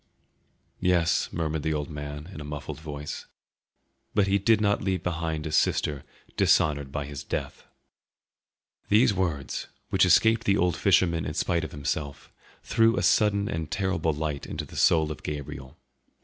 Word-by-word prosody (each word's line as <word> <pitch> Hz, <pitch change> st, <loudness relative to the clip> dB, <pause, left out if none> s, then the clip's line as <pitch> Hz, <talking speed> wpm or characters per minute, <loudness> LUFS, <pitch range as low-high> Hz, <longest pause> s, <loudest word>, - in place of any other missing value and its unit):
"Yes," 90 Hz, -2 st, +2 dB
murmured 80 Hz, -2 st, -2 dB
the 80 Hz, +1 st, -1 dB
old 75 Hz, 0 st, -4 dB
man 75 Hz, 0 st, -6 dB
in 75 Hz, -, -8 dB
a -, -, -6 dB
muffled 75 Hz, 0 st, -6 dB
voice, 75 Hz, -1 st, -7 dB, 0.9 s
"but 105 Hz, -2 st, +4 dB
He 100 Hz, +1 st, +2 dB
did 110 Hz, +3 st, +3 dB
not 105 Hz, -1 st, +1 dB
leave 95 Hz, -2 st, -1 dB
behind 80 Hz, -2 st, -2 dB
a 80 Hz, -, -3 dB
sister 75 Hz, -2 st, +1 dB, 0.3 s
dishonoured 70 Hz, -3 st, +2 dB
by 70 Hz, 0 st, -3 dB
His 70 Hz, -1 st, -7 dB
death." -, -, -5 dB, 1.2 s
These 110 Hz, +2 st, +5 dB
words, 85 Hz, -8 st, -2 dB, 0.2 s
which 95 Hz, -, +4 dB
escaped 110 Hz, +6 st, +4 dB
the 100 Hz, 0 st, +3 dB
old 90 Hz, -1 st, +2 dB
fisherman 90 Hz, -4 st, +3 dB
in -, -, -4 dB
spite 85 Hz, -1 st, 0 dB
of 80 Hz, -, -4 dB
himself, 70 Hz, 0 st, -4 dB, 0.3 s
threw 115 Hz, 0 st, +3 dB
a -, -, 0 dB
sudden 100 Hz, -2 st, +3 dB
and 80 Hz, -3 st, -3 dB
terrible 95 Hz, -5 st, 0 dB
light 75 Hz, -1 st, -3 dB
into -, -, -5 dB
the -, -, -13 dB
soul 80 Hz, -2 st, +3 dB
of 75 Hz, -, -7 dB
Gabriel. 70 Hz, -2 st, -6 dB
80 Hz, 160 wpm, -27 LUFS, 75-95 Hz, 1.2 s, These